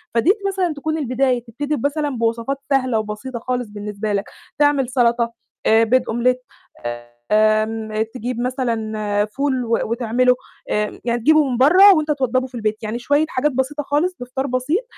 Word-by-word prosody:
فديّة 325 - +4
مثلًا 370 -4 0
تكون 310 +2 -3
البداية، 255 -3 0
تبتدي 290 +6 -3
بمثلًا 290 +3 -1
بوصفات 230 +4 -1
سهلة، 255 -5 +2
وبسيطة 215 +4 -5
خالص 250 -1 -2
بالنسبة 210 0 -4
لك، 200 0 -1 0.3
تعمل 285 -3 +3
سلطة، 235 -2 +1 0.3
آآ 225 +1 +5
بيض 255 +3 +3
omelette 250 +2 +1 0.9
آمم 215 0 +2
تجيب 245 0 -4
مثلًا 220 -5 -1
فول 260 +2 -1
و 230 0 +1
وتعمله، 240 +2 +2 0.3
آآ 210 0 -1
يعني 240 0 0
تجيبه 310 +1 +4
من 245 - -1
برّا 365 +10 +7
وأنت 310 -4 +2
توضّبه 260 -2 0
في 250 - -13
البيت، 215 -1 -2
يعني 220 +3 -3
شوية 290 +5 +2
حاجات 275 +3 0
بسيطة 265 +3 -2
خالص، 310 +6 0
بفطار 260 +2 -3
بسيط، 265 - 0
250 Hz, 155 wpm, -20 LUFS, 225-285 Hz, 0.9 s, برّا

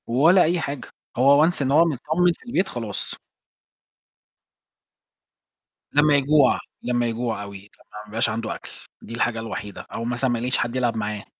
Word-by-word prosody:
ولا 160 +10 +5
أي 175 +2 +1
حاجة، 140 -5 -5 0.3
هو 140 +4 +6
Once 175 - -2
إن 135 -1 0
هو 160 +4 +6
متطمن 160 +4 +1
في - - -21
البيت، 190 -5 0
خلاص. 115 -4 -4 2.8
لمّا 145 0 +4
يجوع 140 -1 +4 0.2
لمّا 120 -1 0
يجوع 115 -2 -2
أوي، 100 -1 -8
لمّا 100 +2 -17 0.3
ما - - -18
يبقاش 110 +2 0
عنده 110 +1 -3
أكل، - - -11 0.3
دي - - -10
الحاجة 115 -1 -1
الوحيدة 105 -2 -6
أو 115 - -4
مثلًا 125 +2 -1
ما 120 - 0
يلاقيش 125 +2 0
حد 120 +1 -2
يلعب 120 -3 0
معاه. 105 -1 -4
125 Hz, 165 wpm, -23 LUFS, 115-145 Hz, 2.8 s, هو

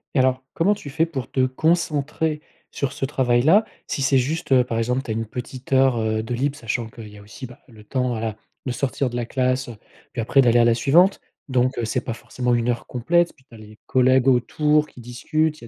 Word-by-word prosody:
Et - - +4
alors, 130 0 +2
comment 185 +5 +2
tu 145 -8 -9
fais 160 +4 +1
pour 135 -8 -6
te 130 -1 +1
concentrer 155 +1 0 0.3
sur 140 -2 -3
ce - - -7
travail-là? 135 - +3 0.2
Si - - -3
c'est 135 0 +3
juste, 140 +4 -2
heu, 125 - +5
par 115 -2 -3
exemple, 125 +3 0
tu 115 - -5
as - - 0
1 115 +1 -2
petite 125 +3 -7
heure, 130 -2 +4
heu, 110 0 -1
de 120 +2 -4
libre, 140 +4 -1
sachant 115 0 -3
qu'il 110 -1 -11
y 105 - -14
a - - -13
aussi, 115 +6 -10
bah, 120 - -15
le 110 -4 -16
temps, 125 +3 -1
voilà, 110 -2 -3 0.3
de 130 - -2
sortir 135 0 -1
de 120 - -7
la 120 - -2
classe, 130 +1 0
heu, 120 - -8 0.4
puis 120 - -2
après 135 +5 +3
d'aller 120 -2 +4
à - - +6
la 120 - +4
suivante. 170 - +4 0.3
Donc, 130 0 +1
heu, 120 - -1
c'est 110 - -1
pas 115 - -4
forcément 120 +1 -2
1 120 +1 0
heure 120 -1 -2
complète. 170 +8 +1
Puis 130 - -26
tu - - -21
as - - -12
les 110 0 -14
collègues 130 0 +3
autour 150 +5 +2
qui 125 - -14
discutent, 155 +6 -1
il - - -10
y - - -11
130 Hz, 245 wpm, -22 LUFS, 120-140 Hz, 0.4 s, à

